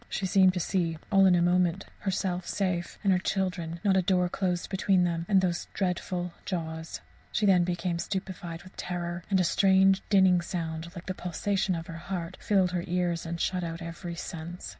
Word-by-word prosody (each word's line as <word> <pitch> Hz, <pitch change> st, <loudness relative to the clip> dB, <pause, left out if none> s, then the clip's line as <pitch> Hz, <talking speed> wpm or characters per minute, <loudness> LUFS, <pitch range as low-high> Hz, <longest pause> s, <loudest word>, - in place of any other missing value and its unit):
She 195 Hz, -, -2 dB
seemed 185 Hz, 0 st, +4 dB
to -, -, 0 dB
see, 170 Hz, -2 st, 0 dB
all 195 Hz, -1 st, +6 dB
in 180 Hz, -, +5 dB
a 170 Hz, -, +3 dB
moment, 180 Hz, +1 st, +2 dB
herself 185 Hz, -2 st, -2 dB
safe, 185 Hz, -4 st, -2 dB
and 195 Hz, -2 st, +4 dB
her 180 Hz, -, +2 dB
children 180 Hz, -3 st, -2 dB
not 195 Hz, -2 st, +3 dB
a 190 Hz, -, +4 dB
door 180 Hz, -1 st, +2 dB
closed 180 Hz, -1 st, -2 dB
between 190 Hz, -1 st, +3 dB
them 170 Hz, -1 st, -1 dB
and 195 Hz, -2 st, +5 dB
those 175 Hz, -2 st, -1 dB
dreadful 180 Hz, -2 st, -2 dB
jaws! 160 Hz, -3 st, -4 dB, 0.3 s
She 210 Hz, -, +1 dB
then 185 Hz, -3 st, +5 dB
became 175 Hz, 0 st, -1 dB
stupefied 180 Hz, -3 st, -4 dB
with 185 Hz, -, -15 dB
terror, 175 Hz, -1 st, -4 dB
and 195 Hz, -2 st, +3 dB
a -, -, +4 dB
strange, 190 Hz, +2 st, +4 dB
dinning 190 Hz, -3 st, +5 dB
sound, 165 Hz, -1 st, -4 dB
like 170 Hz, -, -8 dB
the 185 Hz, -, -3 dB
pulsation 185 Hz, +2 st, -1 dB
of 165 Hz, 0 st, -5 dB
her 165 Hz, -2 st, -7 dB
heart, 175 Hz, 0 st, -5 dB
filled 190 Hz, -3 st, +2 dB
her 175 Hz, -1 st, -1 dB
ears 175 Hz, -1 st, -1 dB
and 170 Hz, 0 st, -4 dB
shut 180 Hz, 0 st, 0 dB
out 165 Hz, 0 st, -4 dB
every 170 Hz, +1 st, -6 dB
sense. 170 Hz, +1 st, -6 dB
180 Hz, 195 wpm, -28 LUFS, 170-190 Hz, 0.3 s, all